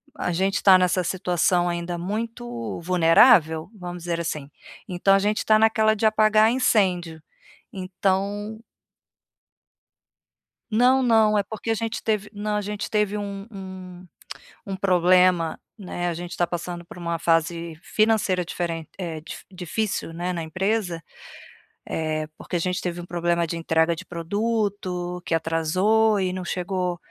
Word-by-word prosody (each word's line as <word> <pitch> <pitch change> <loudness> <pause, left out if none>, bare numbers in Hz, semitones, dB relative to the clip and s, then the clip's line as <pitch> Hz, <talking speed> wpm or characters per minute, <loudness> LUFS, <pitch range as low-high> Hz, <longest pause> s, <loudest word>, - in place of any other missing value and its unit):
a 180 - -2
gente 195 +3 0
tá 190 -2 +8
nessa 180 0 +1
situação 175 0 +1
ainda 175 0 -3
muito 170 - -4
vulnerável, 165 -1 +5
vamos 175 -3 -7
dizer 170 -1 -2
assim, 155 -4 -4 0.4
então 185 +2 +2
a 195 - +5
gente 210 +2 0
tá 215 0 +5
naquela 220 0 +3
de 220 - -1
apagar 215 0 +4
incêndio. 180 -10 +1 0.5
Então 200 +3 -2 2.1
Não, 255 +4 +4
não, 220 -3 +4
é - - +2
porque 220 +3 -6
a - - +3
gente 225 +2 -3
teve 210 -2 -1
não, 210 0 -3
a - - +1
gente 205 0 -5
teve 210 -1 +1
um 200 -1 -5
um 185 -2 -9 0.6
um 195 - -4
problema, 180 -2 +3 0.2
né. 175 -3 -4
A 170 - -1
gente 175 +1 -7
tá 175 - +2
passando 175 0 -5
por 175 - -12
uma 170 -1 -3
fase 165 0 0
financeira 215 -5 +1
diferente, 165 -2 -4
eh, 165 -4 -4
di 155 - -9 0.2
difícil, 185 0 -3
né, 175 +2 -3
na 175 -2 -3
empresa, 190 0 -1 0.8
eh, 155 -1 -2
porque - - -6
a 175 - +2
gente 180 +2 -1
teve 175 -1 -4
um - - -9
problema 170 -1 0
de 165 +1 -4
entrega 165 0 +2
de 175 +3 -8
produto, 185 -1 -2
que 165 - +1
atrasou, 185 +7 +2
e 185 - 0
não 185 -1 -5
chegou 180 -1 -2
180 Hz, 150 wpm, -24 LUFS, 170-210 Hz, 2.1 s, tá